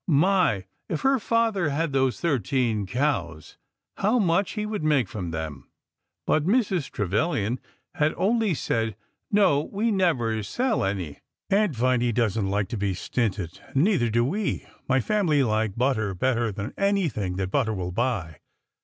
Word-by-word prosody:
My! 165 - +3 0.2
If 160 - -2
her 270 0 +3
father 225 -7 +1
had 145 +1 -1
those 135 -2 +1
thirteen 120 - 0
cows, 120 - -2 0.4
how 215 +5 +2
much 190 -2 +2
he 210 -1 -2
would 210 -6 -3
make 145 -7 +2
from 90 -3 -5
them! 80 -2 -6 0.6
But 155 - +2
Mrs. 190 - +1
Trevilian 110 - -1 0.3
had 150 +1 +1
only 220 -2 +2
said: 115 -5 -1 0.4
No, 195 -9 +4
we 220 +3 0
never 125 - +1
sell 240 - 0
any. 95 -7 -3 0.3
Aunt 200 -6 +3
Viny 120 0 +2
does 115 -3 +1
n't 100 -4 0
like 100 0 0
to 115 - -3
be 100 -2 -1
stinted, 95 -4 -2 0.2
and 135 - +4
neither 175 - +2
do 115 +2 +2
we. 195 +9 -2 0.2
My 130 0 +3
family 160 - +2
like 110 -3 0
butter 115 -6 0
better 120 +1 +1
than 105 +4 -5
anything 165 - 0
that 95 0 -2
butter 115 -6 +1
will 90 -2 -3
buy." 100 - -2
130 Hz, 155 wpm, -25 LUFS, -, 0.6 s, No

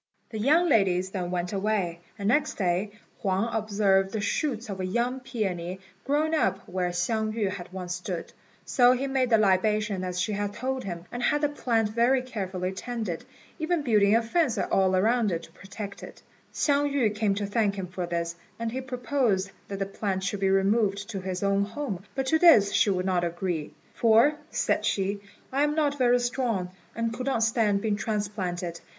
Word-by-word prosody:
The 220 - -4
young 310 +10 +4
ladies 190 - +2
then 180 -3 -3
went 180 +1 -2
away, 195 -4 -1 0.2
and 200 -2 -3
next 290 +6 +2
day 185 +1 0 0.3
Huang 195 +4 0
observed 200 -3 +2
the 220 - -1
shoots 235 +3 -1
of 195 -2 -5
a - - -2
young 240 +7 -1
peony 190 -8 -3 0.3
growing 300 +3 +1
up 195 - 0
where 180 0 -1
Hsiang 215 +5 -1
yü 210 -4 0
had 180 -2 -7
once 180 -1 -4
stood. 180 -1 -5 0.3
So 245 -1 +5
he 255 +2 -1
made 265 -2 +1
the 225 - +5
libation 210 0 +2
as 180 -1 -3
she 185 +4 0
had 205 0 -2
told 260 0 -3
him, 175 -2 -5
and 245 - -4
had 295 +4 +2
the 295 - +2
plant 230 -6 0
very 240 +4 +2
carefully 190 -6 -3
tended, 215 -4 -4 0.3
even 320 0 0
building 210 -4 +4
a 230 - +3
fence 260 +1 +1
all 190 -1 +2
round 225 +2 +2
to - - -14
protect 200 +1 -8
it. - - -11 0.3
Hsiang 285 -1 +1
yü 245 -7 +2
came 210 -2 +1
to 205 0 -2
thank 205 -1 +1
him 190 -2 -4
for 180 0 -5
this, 170 0 -2 0.2
and 230 0 -3
he 260 +2 -3
proposed 250 -6 0 0.2
that 200 - -5
the 195 - -1
plant 195 -1 -3
should 200 +1 -2
be 195 -1 +2
removed 200 +1 +2
to 195 -3 -4
his 185 0 -4
own 200 0 +2
home; 205 -4 -4
but 270 -1 -1
to 320 +5 +2
this 225 - +6
she - - +4
would 185 -2 0
not 180 -2 +1
agree, 170 -2 -2 0.2
"for," 230 +5 +5 0.2
said - - 0
she, 200 +1 0 0.3
"I 275 +2 +1
am 295 +1 +2
not 290 -2 +1
very 245 -1 +4
strong, 240 -7 -1 0.2
and 230 0 -1
could 250 +3 -5
not 245 -4 +1
stand 220 -3 +2
being 210 -2 +1
transplanted. 190 -6 -3
205 Hz, 195 wpm, -27 LUFS, 190-245 Hz, 0.3 s, this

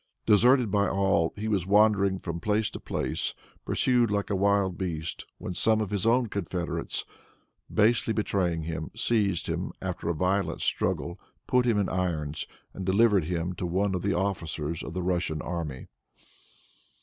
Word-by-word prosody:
Deserted 120 +2 +5
by 100 0 +3
all, 95 -4 +2
he 105 +1 -4
was 95 -5 0
wandering 100 -2 +4
from 85 -2 -5
place 105 +3 0
to - - -7
place, - - -2 0.3
pursued 125 -2 +2
like 105 0 -1
a - - +2
wild 100 -1 +2
beast, 85 -4 -4
when 90 - -5
some 110 +4 +3
of 105 -2 -2
his 100 +1 0
own 120 +2 +4
confederates, 90 -5 -3 0.7
basely 110 +1 +3
betraying 90 -6 0
him, 80 0 -4
seized 100 -7 +1
him, - - -2
after - - -3
a 85 - 0
violent 95 +4 0
struggle, 85 +2 -1 0.3
put 125 -1 +2
him 115 -3 +3
in 100 - +1
irons, 80 -5 -2 0.3
and 95 - -6
delivered 100 -1 +4
him 85 +1 -2
to 90 - -3
one 95 +3 0
of 90 - -1
the 100 -1 0
officers 85 -5 -2
of 80 - -7
the 90 - -2
Russian 85 -3 0
army. 80 -6 -4
95 Hz, 160 wpm, -28 LUFS, 85-105 Hz, 0.7 s, Deserted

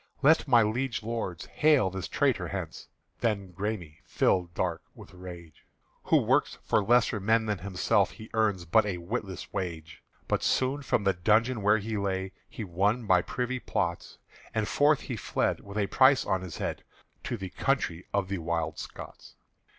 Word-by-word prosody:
Let 155 +2 +5
my 120 -4 +6
liege 115 +2 -1
lords 110 -7 -4
hale 150 -11 +3
this 95 0 -4
traitor - - +1
hence!" - - -6 0.3
The 115 -3 +2
Græme 95 -3 -5
fired 90 -2 +1
dark 85 -3 -1
with - - -13
rage: 85 -4 -11 0.4
"Who - - +4
works - - +2
for 105 - +2
lesser 120 0 +3
men 110 +3 +2
than 105 -3 -1
himself, 95 -2 +1
He 110 0 -11
earns 105 -5 +1
but 110 +7 +4
a 100 -3 -2
witless 95 +2 -5
wage!" 85 -5 -5 0.3
But - - 0
soon 130 +2 +1
from 120 -6 0
the 100 -1 +3
dungeon 110 +6 +2
where 105 +2 +4
he 110 +1 -3
lay 95 -1 -2 0.2
He 115 - -6
won 100 +6 0
by 90 -3 +4
privy 125 +6 -3
plots, - - -3 0.4
And 110 -1 0
forth 145 +1 +3
he 125 - -5
fled - - -1
with 100 +1 -9
a 105 - +2
price 130 +6 +4
on 95 -1 0
his 90 -3 -7
head - - -4 0.4
To 120 - -2
the 95 -2 -6
country 95 -11 -1
of 100 -2 0
the 100 -1 -3
Wild 85 0 -2
Scots. - - -10
100 Hz, 175 wpm, -28 LUFS, 90-115 Hz, 0.4 s, my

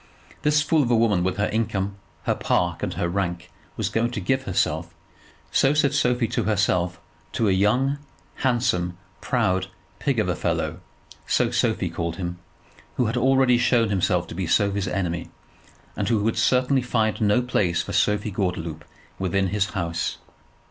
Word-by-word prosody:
This 150 0 +3
fool 155 +1 +3
of 125 - 0
a 120 - +4
woman 110 -6 +3
with 95 +2 -1
her 105 - +2
income, 100 -3 -1 0.3
her - - +1
park, - - 0
and - - -3
her 85 - 0
rank, 85 -1 -3 0.3
was - - 0
going 115 +1 0
to - - -2
give 130 +8 0
herself, 95 - -1 0.6
so 135 +2 +3
said 145 -2 +3
Sophie 125 -1 +2
to - - -1
herself, 90 -4 +1 0.3
to 110 - +1
a - - +3
young, 120 +9 +2 0.4
handsome, 120 -9 0 0.2
proud 95 0 +1 0.3
pig 140 -4 0
of 105 -4 +1
a 90 - 0
fellow, - - -2 0.5
so - - +2
Sophie - - 0
called 85 -1 -3
him, 90 -1 -5 0.6
who 125 - +1
had 115 +2 -1
already 130 0 +4
shown 120 -2 +3
himself 90 -3 +1
to - - -6
be 90 0 -3
Sophie's 100 +2 +1
enemy, 85 -3 -2 0.7
and - - -1
who 110 -3 +2
would 115 +1 +1
certainly 130 +1 +2
find 115 -3 0
no 105 +3 +3
place 95 -8 +1
for - - -6
Sophie 105 +1 +1
Gordeloup 85 -5 -3 0.4
within 95 0 0
his 100 +1 +1
house. 85 -2 -2
105 Hz, 170 wpm, -24 LUFS, 90-120 Hz, 0.7 s, a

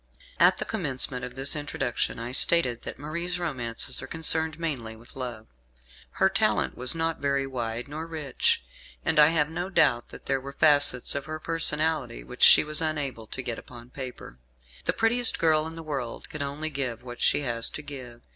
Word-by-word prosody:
At - - +5
the - - -3
commencement 135 - -1
of 125 0 -7
this 135 +4 +2
Introduction 145 -5 -3
I 115 +1 -6
stated 130 -3 +5
that - - -7
Marie's 170 +5 -4
romances 130 -10 -2
are - - -8
concerned 160 0 +2
mainly 130 -9 -3
with 115 +2 -16
love. 120 -4 -6 0.7
Her - - +3
talent - - +1
was 125 +5 +4
not 165 0 -2
very 140 -1 0
wide 120 -2 -4
nor 155 +3 -6
rich, 150 - -1 0.4
and 160 -1 +2
I 150 - +9
have 155 -2 +2
no 175 +3 -4
doubt 120 -10 +2
that - - -12
there 135 -1 0
were 140 +1 -8
facets 145 -4 +4
of 140 -1 -4
her 155 +1 -6
personality 155 - 0
which - - -11
she - - +8
was 155 +1 +2
unable 140 -8 -3
to 130 - -4
get 120 -2 -3
upon 120 0 -13
paper. 125 - -9 0.5
The - - +1
prettiest 235 +1 +2
girl 155 -1 +2
in 165 - -9
the 165 - -8
world 135 -6 -5
can 155 - -6
only 145 +3 -4
give 130 -5 -4
what 120 -1 -9
she - - +2
has 120 -4 +1
to 150 - -7
give. 125 -5 -9
140 Hz, 190 wpm, -26 LUFS, 125-160 Hz, 0.7 s, I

